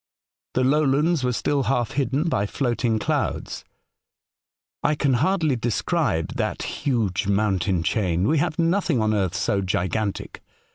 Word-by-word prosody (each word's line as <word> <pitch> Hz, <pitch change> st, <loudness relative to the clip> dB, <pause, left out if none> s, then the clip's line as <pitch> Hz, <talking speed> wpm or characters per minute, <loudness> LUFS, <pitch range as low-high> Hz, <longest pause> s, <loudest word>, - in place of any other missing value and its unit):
The 130 Hz, -, +2 dB
lowlands 150 Hz, +3 st, +2 dB
were 125 Hz, -, +1 dB
still 140 Hz, +4 st, 0 dB
half 120 Hz, -2 st, 0 dB
hidden 140 Hz, +4 st, 0 dB
by 100 Hz, -10 st, 0 dB
floating 120 Hz, -2 st, 0 dB
clouds. -, -, -2 dB, 1.2 s
I 150 Hz, -, +2 dB
can 140 Hz, -2 st, +1 dB
hardly 155 Hz, +2 st, +2 dB
describe 120 Hz, -, -1 dB
that -, -, -2 dB
huge 115 Hz, -, -1 dB
mountain 95 Hz, -4 st, +1 dB
chain. 90 Hz, -1 st, 0 dB
We 155 Hz, 0 st, +2 dB
have 155 Hz, -, -1 dB
nothing 170 Hz, -5 st, +1 dB
on 110 Hz, 0 st, +1 dB
earth 95 Hz, -4 st, 0 dB
so 100 Hz, 0 st, 0 dB
gigantic. 95 Hz, +3 st, -2 dB
120 Hz, 135 wpm, -23 LUFS, 100-145 Hz, 1.2 s, The